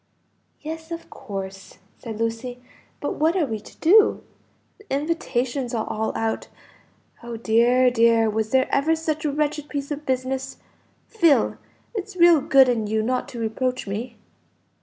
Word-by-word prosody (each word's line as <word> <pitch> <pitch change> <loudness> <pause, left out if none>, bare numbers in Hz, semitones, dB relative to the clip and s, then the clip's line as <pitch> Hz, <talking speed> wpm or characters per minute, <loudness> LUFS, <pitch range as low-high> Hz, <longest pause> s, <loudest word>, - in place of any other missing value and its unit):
"Yes, 320 +1 -7
of 335 0 -7
course," 195 -5 -7 0.2
said 225 -3 -7
Lucy. 230 +2 -3 0.4
"But - - -3
what 320 +4 +2
are 355 -5 +2
we 220 -5 -4
to 210 - -16
do? 410 +6 +5 0.6
the 415 - -18
invitations 270 -4 -1
are 220 - -1
all 220 0 -2
out. 225 0 -2 0.7
Oh 235 -1 -6
dear, 240 +3 +3
dear, 230 -1 +4
was 220 0 -1
there 260 +1 +3
ever 315 +4 +3
such 315 -1 -3
a 295 - +1
wretched 295 0 -2
piece 285 0 -4
of 295 +1 -4
business! 260 0 -2 0.5
Phil, 335 -10 +3 0.4
it's 410 -3 -5
real 340 -4 +6
good 270 -1 +5
in 230 -4 0
you 220 +1 0
not 250 +2 -1
to 240 - -8
reproach 250 +3 -2
me." 220 +4 -5
255 Hz, 155 wpm, -23 LUFS, 225-305 Hz, 0.7 s, real